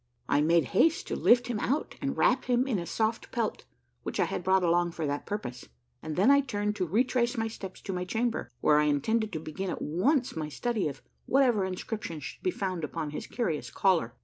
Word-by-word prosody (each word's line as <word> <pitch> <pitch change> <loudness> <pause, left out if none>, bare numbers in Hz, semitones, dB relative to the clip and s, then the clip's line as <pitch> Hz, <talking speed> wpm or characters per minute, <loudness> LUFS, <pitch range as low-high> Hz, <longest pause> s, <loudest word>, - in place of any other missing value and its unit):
I 145 - +3
made 165 +2 +4
haste 320 - +3
to - - -1
lift 245 0 +4
him 240 -3 -2
out 280 +8 -1
and 275 -1 -2
wrap 255 +2 +3
him 245 0 +2
a 200 -10 -1
soft 220 +5 -1
pelt, 230 -3 -2 0.4
which - - -5
I - - +4
had - - -4
brought 190 0 +3
along 175 0 +2
for 165 -2 -3
that 145 0 -3
purpose, 130 - -5 0.3
and 155 -1 -5
then 200 +9 +5
I 280 0 +6
turned 210 -5 -2
to 185 -3 -1
retrace 240 - +1
my 225 0 0
steps 195 -4 -8
to 195 - -4
my 180 0 -2
chamber, 230 +5 -1
where 150 0 +5
I 150 - +3
intended 215 +10 +1
to 160 - -2
begin 160 +5 -5
at - - -3
once 245 - +1
my 155 -2 -3
study 220 +4 -1
of 140 -2 -7 0.2
whatever 245 -7 +3
inscriptions 185 -4 -5
should - - -8
be 375 - +1
found 185 - -3
upon 155 0 -3
his 150 - -6
curious 180 -11 -2
collar. 170 -12 +1
195 Hz, 215 wpm, -29 LUFS, 165-240 Hz, 0.4 s, I